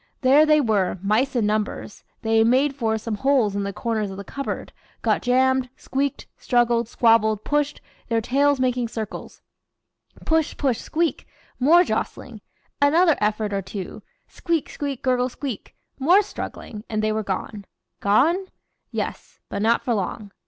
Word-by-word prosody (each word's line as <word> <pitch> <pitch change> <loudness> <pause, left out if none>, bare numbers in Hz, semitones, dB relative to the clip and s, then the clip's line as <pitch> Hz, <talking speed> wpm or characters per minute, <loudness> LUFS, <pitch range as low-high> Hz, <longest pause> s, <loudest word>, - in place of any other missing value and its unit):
There 285 +4 +5
they 305 0 +5
were, 210 -9 +1
mice 240 +7 +1
in 235 -3 +2
numbers; 210 0 -2 0.2
they 225 0 +3
"made 260 +5 +3
for" 225 -4 0
some 220 -1 -4
holes 260 -5 +2
in 200 - -1
the 200 0 -3
corners 215 0 -2
of 190 - -8
the 200 - -6
cupboard, 275 +6 -5 0.3
got - - +2
jammed, 260 +1 +2
squeaked, 275 +1 -2
struggled, 240 -1 +2
squabbled, 220 -3 +3
pushed, 295 0 -1 0.3
their 230 -1 +2
tails 275 +4 +2
making 250 -2 0
circles; 220 -2 -7 0.8
push 320 -1 +1
push 260 -5 0
squeak! 330 0 -2 0.3
more 325 +7 +6
jostling, - - -4 0.4
another 320 +3 +5
effort 210 0 0
or 195 - 0
two 190 0 -7 0.3
squeak 335 -3 -2
squeak 280 -3 -5
gurgle 255 -1 +1
squeak 255 -3 -7 0.2
more 355 +10 +5
struggling 215 - -7
and 215 -1 -1
they 215 - +1
were 215 0 -1
gone. 200 +1 -5 0.3
Gone? 320 - +2 0.4
Yes! - - -5
but - - -3
not 230 +2 +2
for 245 - 0
long. 205 0 -3
240 Hz, 150 wpm, -23 LUFS, 215-280 Hz, 0.8 s, more